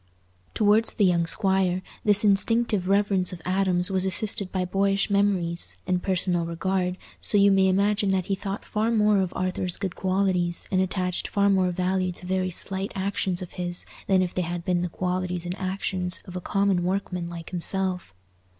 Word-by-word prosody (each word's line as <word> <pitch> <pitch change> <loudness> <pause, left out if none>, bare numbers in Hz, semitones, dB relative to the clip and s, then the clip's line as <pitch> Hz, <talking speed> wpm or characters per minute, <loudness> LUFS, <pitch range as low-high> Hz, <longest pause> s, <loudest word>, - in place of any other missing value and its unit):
Towards 215 +1 +3
the 205 - +3
young 170 -2 +2
squire 190 0 +1 0.2
this 210 0 +4
instinctive 210 -1 +2
reverence 195 -2 +2
of 170 - -9
Adam's 185 -1 +1
was 190 -1 +2
assisted 190 +1 +2
by 185 -1 -1
boyish 195 +2 0
memories 190 -4 0
and 180 -1 0
personal 180 -2 +1
regard 180 +2 -2 0.2
so 210 - +4
you 200 0 +5
may 195 -1 +4
imagine 200 +1 +1
that 190 -2 0
he 195 - -1
thought 195 0 -5
far 215 +2 -1
more 210 -3 +3
of 185 -2 -1
Arthur's 185 -1 -2
good 190 -3 -4
qualities, 185 -2 0
and 185 -1 +2
attached 185 -1 -2
far 200 0 +2
more 190 -2 +2
value 185 +1 -1
to 180 - -12
very 185 0 -1
slight 190 +2 -3
actions 190 -2 -2
of 180 - -10
his, 175 0 -2 0.2
than 190 -1 +3
if 180 - -4
they 185 - -1
had 175 0 -4
been 180 -1 +1
the 180 - -2
qualities 180 0 -2
and 175 +1 -3
actions 185 -1 -1
of 180 - -10
a 180 - -4
common 195 -1 +1
workman 180 -2 -2
like 170 -1 -8
himself. 185 - -1
185 Hz, 180 wpm, -25 LUFS, 180-195 Hz, 0.2 s, you